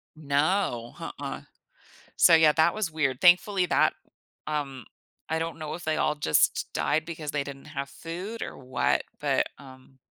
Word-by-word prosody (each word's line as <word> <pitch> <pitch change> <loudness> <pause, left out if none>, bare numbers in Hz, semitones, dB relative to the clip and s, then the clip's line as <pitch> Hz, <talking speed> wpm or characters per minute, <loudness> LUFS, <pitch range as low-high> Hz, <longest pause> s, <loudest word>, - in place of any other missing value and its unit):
No, 145 -3 0
nuh-uh. - - -6 0.8
So, 170 - +7
yeah, 160 -2 +6
that 160 +2 +3
was 215 -6 -2
weird. 135 -5 -1
Thankfully, 180 +1 +5
that - - +3 0.5
um, 140 -5 -3 0.4
I 160 - 0
don't 165 0 -4
know 155 -1 -5
if 175 - -8
they 155 0 0
all 150 - +1
just 115 - +2
died 155 +2 0
because 160 -3 -5
they 145 -1 0
didn't 140 0 -9
have 140 -2 -5
food 185 +10 -7
or - - -5
what, 130 -1 0 0.2
but, - - +1
um, 130 -1 -15
155 Hz, 160 wpm, -27 LUFS, 140-165 Hz, 0.8 s, So